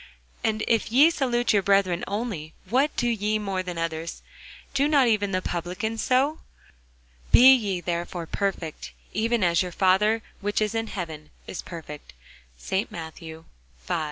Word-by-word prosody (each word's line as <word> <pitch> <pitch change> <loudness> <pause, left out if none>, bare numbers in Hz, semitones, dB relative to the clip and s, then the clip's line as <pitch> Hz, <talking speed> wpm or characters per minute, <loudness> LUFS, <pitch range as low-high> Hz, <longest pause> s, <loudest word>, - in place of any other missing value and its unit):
And 220 -1 0
if 225 -1 +1
ye 285 +7 +6
salute 245 -6 +1
your 205 - +4
brethren 190 -3 +2
only, 200 -7 -4
what 265 +8 +1
do 240 - 0
ye 215 -2 0
more 195 -3 -2
than 180 -2 -6
others? 165 0 -4 0.5
do 275 +1 +2
not 285 -4 +4
even 205 -3 +1
the 185 0 -1
publicans 180 +6 -3
so? 275 +5 +2 0.9
Be 260 +2 +9
ye 200 -8 0
therefore 175 0 -3
perfect, 180 -3 -3 0.2
even 230 0 +1
as 170 -1 +3
your 180 -1 -3
Father 205 +5 +3 0.2
which 205 0 -1
is 215 0 0
in 225 0 -1
heaven 160 -7 -6 0.2
is - - -6
perfect. 155 - -9 0.4
ST. 190 - -2
MATTHEW, 160 0 -8 0.4
V. - - -1
200 Hz, 155 wpm, -25 LUFS, 175-225 Hz, 0.9 s, Be